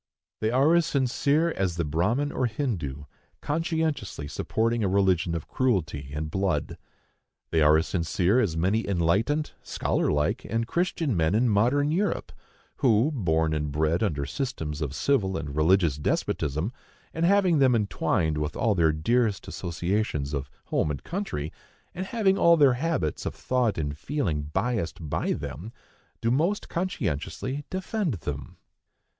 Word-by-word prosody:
They 110 - +1
are 135 +7 +4
as 170 -1 +3
sincere 140 +3 +1
as 95 - -1
the 85 -1 -1
Brahmin 105 - 0
or 130 - 0
Hindoo, 95 - -3 0.4
conscientiously 160 - -2
supporting 115 +8 -1
a - - +2
religion 95 -3 +2
of 80 - -5
cruelty 85 - -1
and 75 +1 -4
blood. 95 0 -1 0.7
They 80 - +3
are 75 +1 +6
as 80 - +1
sincere 90 +5 +1
as 90 -9 0
many 95 +7 +1
enlightened, 100 - +1
scholarlike 75 0 0
and 115 +1 -1
Christian 165 - 0
men 80 +3 +2
in 120 +2 +3
modern 125 +8 +2
Europe, 195 +5 -1 0.5
who, 120 +3 +3
born 80 - +1
and 75 -1 -2
bred 80 +3 +1
under 75 -10 0
systems 80 - -4
of 70 -2 -3
civil 95 - +1
and 75 -3 -5
religious 80 -1 +3
despotism, 75 - -1 0.4
and 165 - -2
having 185 -3 +4
them 130 -3 +5
entwined 85 -7 0
with 75 0 -3
all 115 -3 +2
their 85 -4 +3
dearest 105 +7 0
associations 85 -4 -2
of 70 -2 -3 0.2
home - - 0
and 75 - -4
country, 170 - -4 0.4
and 185 +1 -4
having 200 -4 +2
all 170 0 +6
their 140 -4 +6
habits 135 - -1
of - - -4
thought 125 -4 0
and 75 -2 -3
feeling 95 - -1
biased 95 +5 -2
by - - 0
them, 95 +9 -6 0.5
do 115 - +1
most 170 +11 0
conscientiously 130 - -3
defend 190 - -2
them. 70 -4 -6
100 Hz, 150 wpm, -26 LUFS, -, 0.7 s, are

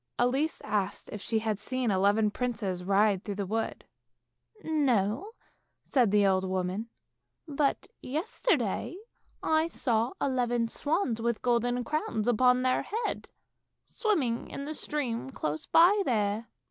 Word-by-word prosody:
Elise 270 +6 +1
asked 200 -2 -2
if 210 - -6
she 225 - -1
had 215 -2 -1
seen 245 +2 -1
eleven 205 +3 +3
princes 210 -7 -2
ride 200 +1 +3
through 205 -3 -4
the 200 0 -2
wood. 225 +4 -3 0.5
" 425 - -29
No," 270 - +1 0.5
said 245 -6 +2
the 205 0 +4
old 190 -1 +3
woman, 190 +4 -2 0.3
" - - -55 0.2
but 285 -2 0 0.2
yesterday 330 - -1 0.5
I 315 +1 +2
saw 235 -6 0
eleven 245 -3 0
swans, 290 - -1
with 235 -1 -1
golden 245 0 +1
crowns 240 -6 -2
upon 250 +2 +4
their 255 0 +2
heads, 450 +4 -3 0.6
swimming 290 - -1
in 280 - -6
the 305 - -4
stream 265 -6 -3
close 155 - -4
by 370 +5 +6
there." 215 - 0
235 Hz, 135 wpm, -29 LUFS, 210-275 Hz, 0.6 s, by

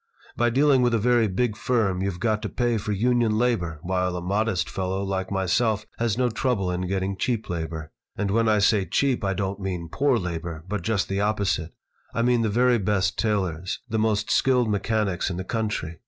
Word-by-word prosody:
By 120 0 +2
dealing 135 +2 +4
with 120 -1 +3
a - - +3
very 120 +1 +3
big 105 +3 0
firm 105 -6 0
you've 95 -2 -2
got 110 -2 0
to - - -3
pay 120 -2 0
for 105 - -4
union 115 +1 +2
labor, 110 -9 0
while 90 0 0
a - - -2
modest 100 +1 0
fellow 95 +1 -2
like 95 -1 -2
myself 105 +3 +1
has 115 -2 0
no 125 -1 +2
trouble 110 -6 0
in 90 0 -2
getting 95 +1 -1
cheap 115 -1 -2
labor. 80 -2 -4 0.3
And 100 -2 -1
when 115 +1 +2
I 105 - +4
say 100 -1 +3
cheap 135 -1 +1
I 95 -1 0
don't 100 +1 -2
mean 90 -4 -4
poor 140 -3 +2
labor, 85 -4 -4
but 105 0 -2
just 100 +1 0
the 95 +1 -1
opposite. 100 -6 -1 0.4
I 115 - +1
mean 120 -1 +3
the 110 - +1
very 120 +2 +3
best 100 -1 +1
tailors, 95 -5 -1
the 110 -2 -1
most 110 -1 +1
skilled 125 -4 +3
mechanics 105 -2 0
in 90 - -4
the 95 - -3
country. 105 -6 -3
105 Hz, 200 wpm, -25 LUFS, 95-115 Hz, 0.4 s, dealing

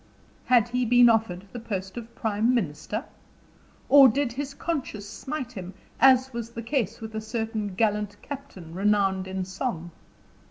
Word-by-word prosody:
Had 240 -3 +4
he 250 +1 0
been 245 0 +6
offered 215 -5 +1
the 245 - -6
post 195 -4 -5
of 235 -1 -8
prime 220 +3 +1
minister? 190 - -2 0.8
Or 275 -1 +9
did 260 +2 +1
his 275 +3 -5
conscience 270 -12 -3
smite 260 +5 -5
him, 190 -5 -8 0.2
as 265 -1 +5
was 235 -1 -4
the 235 0 -7
case 230 -4 -1
with 220 0 -7
a 220 - -3
certain 220 -3 -3
gallant 210 -1 0
captain 260 - -9
renowned 195 -1 +1
in 190 0 -3
song? 190 -3 -4
225 Hz, 155 wpm, -26 LUFS, 195-250 Hz, 0.8 s, Or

